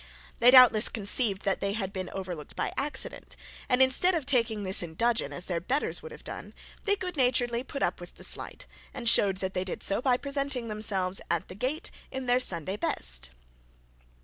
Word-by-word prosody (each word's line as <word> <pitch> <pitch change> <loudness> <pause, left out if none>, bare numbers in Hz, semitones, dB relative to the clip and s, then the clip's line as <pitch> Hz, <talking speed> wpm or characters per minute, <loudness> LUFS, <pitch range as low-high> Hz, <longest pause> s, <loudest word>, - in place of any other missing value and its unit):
They 240 - +7
doubtless 250 -4 +7
conceived 205 -1 +1
that 195 - 0
they 200 0 -1
had 195 -3 -4
been 185 -1 -4
overlooked 180 -6 -7
by - - -2
accident; 285 +2 -5 0.3
and 250 +1 +5
instead 345 +8 +4
of 315 -5 -2
taking 230 -6 +1
this 190 0 +2
in 165 -2 -7
dudgeon, 235 +4 +1
as 180 - -5
their 175 -2 -2
betters 265 +11 0
would 470 - -10
have - - -12
done, - - -8 0.3
they 405 -1 +3
good 365 -3 -5
naturedly 245 -2 +1
put 275 +1 -5
up - - -1
with - - -11
the - - -12
slight, - - 0 0.3
and 235 - -4
showed 200 -4 +5
that 190 - -4
they 185 - -1
did 185 - -5
so 200 +3 +1
by 255 -2 +2
presenting 275 -4 -2
themselves 195 -3 0
at 170 -1 -1
the - - -7
gate 265 - -3 0.2
in 265 0 -5
their 245 0 +3
Sunday 185 -4 -1
best. - - -1
230 Hz, 200 wpm, -28 LUFS, 190-260 Hz, 0.3 s, They